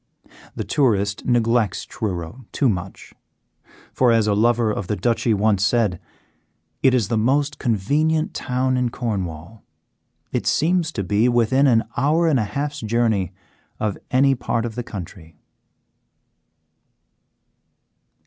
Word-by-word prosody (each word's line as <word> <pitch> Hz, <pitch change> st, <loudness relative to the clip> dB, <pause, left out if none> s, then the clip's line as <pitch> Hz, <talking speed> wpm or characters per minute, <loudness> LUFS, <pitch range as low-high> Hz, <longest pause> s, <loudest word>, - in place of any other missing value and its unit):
The -, -, -3 dB
tourist 105 Hz, -7 st, 0 dB
neglects 115 Hz, -4 st, +1 dB
Truro 100 Hz, +4 st, -5 dB
too 140 Hz, -, +1 dB
much, 95 Hz, -4 st, -4 dB, 0.8 s
for 125 Hz, -2 st, +3 dB
as 115 Hz, -2 st, +3 dB
a 105 Hz, -, +2 dB
lover 115 Hz, +1 st, +2 dB
of 105 Hz, -3 st, -4 dB
the 105 Hz, -, -1 dB
Duchy 115 Hz, +4 st, 0 dB
once 105 Hz, -2 st, +2 dB
said: 105 Hz, -5 st, +1 dB, 0.8 s
"It 130 Hz, -1 st, +4 dB
is 115 Hz, -6 st, +1 dB
the 115 Hz, -2 st, +1 dB
most 140 Hz, +6 st, +1 dB
convenient 150 Hz, +9 st, 0 dB
town 130 Hz, 0 st, -1 dB
in 125 Hz, -1 st, +1 dB
Cornwall; 100 Hz, -, -5 dB, 0.7 s
it -, -, -2 dB
seems 165 Hz, +1 st, +1 dB
to 100 Hz, -, -2 dB
be 105 Hz, +6 st, +2 dB
within 120 Hz, +4 st, +3 dB
an 115 Hz, -3 st, +4 dB
hour 160 Hz, +4 st, +2 dB
and 145 Hz, -5 st, +3 dB
a 110 Hz, -, 0 dB
half's 145 Hz, +7 st, -4 dB
journey 110 Hz, -5 st, 0 dB, 0.5 s
of 105 Hz, -2 st, -1 dB
any 135 Hz, +2 st, +4 dB
part 120 Hz, -2 st, -2 dB
of 115 Hz, -, -4 dB
the 120 Hz, -, -4 dB
county." 85 Hz, -7 st, -9 dB
115 Hz, 130 wpm, -21 LUFS, 105-130 Hz, 0.8 s, It